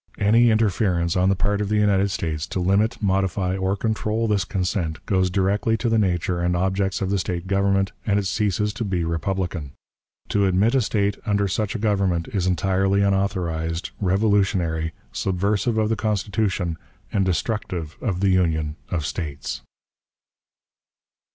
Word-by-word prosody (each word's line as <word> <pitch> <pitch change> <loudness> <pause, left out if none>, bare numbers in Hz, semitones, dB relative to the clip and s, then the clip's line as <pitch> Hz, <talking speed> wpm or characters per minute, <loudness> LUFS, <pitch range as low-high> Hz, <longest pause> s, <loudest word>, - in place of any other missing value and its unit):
Any 115 +4 +4
interference 95 -6 +1
on 90 +1 +3
the 95 - +3
part 105 +2 0
of 100 - -2
the 105 - +1
United 100 -2 +3
States 80 -5 -3
to - - -3
limit, 100 +5 +1
modify, 95 -1 +1
or 95 +1 0
control 110 +1 -1
this 100 -4 +1
consent 90 -4 -2
goes 95 -2 +2
directly 100 +4 +1
to 120 - -1
the 115 -1 +3
nature 90 -3 0
and 90 0 +1
objects 95 +1 0
of 95 0 -1
the 100 - +1
State 90 -1 -3
government, 100 0 +1
and 100 -2 +1
it 100 - 0
ceases 105 +1 0
to 115 - -3
be 95 -5 -1
republican. 85 -2 -2 0.6
To 100 -1 +2
admit 95 +6 +2
a 135 - +4
State 100 -2 0
under 100 -2 +1
such 105 +3 -2
a - - 0
government 100 -6 0
is 95 -3 -1
entirely 95 +2 +2
unauthorized, 90 -5 -1
revolutionary, 95 -5 +1 0.2
subversive 100 +4 0
of 110 -1 +2
the 115 - +1
Constitution, 100 -5 -1 0.3
and 100 - +2
destructive 90 -4 -2
of 95 -7 -2
the 100 - +3
Union 80 -4 +1
of 85 -5 -2
States. 70 -4 -4
95 Hz, 155 wpm, -23 LUFS, 90-105 Hz, 0.6 s, Any